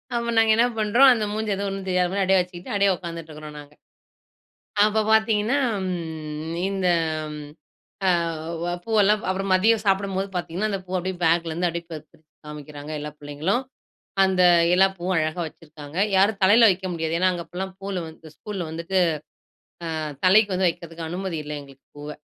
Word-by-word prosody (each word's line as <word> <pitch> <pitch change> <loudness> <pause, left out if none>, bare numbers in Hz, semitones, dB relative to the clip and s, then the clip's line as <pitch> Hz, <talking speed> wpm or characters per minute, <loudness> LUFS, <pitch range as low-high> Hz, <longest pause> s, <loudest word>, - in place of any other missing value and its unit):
அப்ப 235 0 -1
நாங்க 225 -1 +5
என்ன 235 - +5
பண்றோம். 235 +6 +6
அந்த 225 -3 -1
மூஞ்சுல 215 0 -1
எதுவும் 200 +1 -3
ஒண்ணும் 195 0 -6
தெரியாத 180 -1 +1
மாதிரி 195 -1 +2
வெச்சுக்கிட்டு 180 0 -5
அப்டியே 200 -1 +3
உக்காந்துட்டு 170 -2 -8
இருக்கோம் 150 0 -9
நாங்க. 145 0 -13 1.1
அப்பப் 215 0 +1
பாத்தீங்கன்னா 220 +3 +3 0.3
ம் 160 -3 -5 0.2
இந்த 190 -2 -1 1.2
ஆ - - +4 0.5
வ 175 - -2 0.2
பூவல்லாம் 210 -1 +3
அப்புறம் 195 +1 -2
மதியம் 215 +3 +3
சாப்பிடும்போது 195 0 0
பாத்தீங்கன்னா, 180 +4 -2
அந்தப் 195 -2 -4
பூ 180 - -9
அப்டியே 185 +1 -3
பேக்லருந்து 165 +1 +1
அப்டியே 170 0 -4
க - - -4 0.5
காமிக்கிறாங்க 150 0 -9
எல்லா 150 0 -5
புள்ளைங்களும். 150 - -1 0.6
அந்த 190 -1 +2 0.3
எல்லா 190 +2 +6
பூவும் 180 +2 -2
அழகா 155 +2 -1
வச்சிருக்காங்க. 150 -1 -12 0.2
யாரும் 200 +2 +3
தலையில 220 +4 +7
வைக்க 190 +1 -4
முடியாது. 165 0 -1
அங்க 175 -1 -4
அப்டிலாம் 190 +1 -6
பூவல்லாம் 190 -4 -4 0.3
ஸ்கூல்ல 200 -4 -5
வந்துட்டு, 170 +4 -3 1.0
ஆ - - -2 0.3
தலைக்கு 200 +2 +5
வந்து 185 0 +2
வைக்கிறதுக்கு 165 0 -7
அனுமதி 180 0 -4
இல்ல 150 0 -6
எங்களுக்குப் 135 -1 -18
பூவ. 145 +1 -7
185 Hz, 155 wpm, -24 LUFS, 165-200 Hz, 1.2 s, தலையில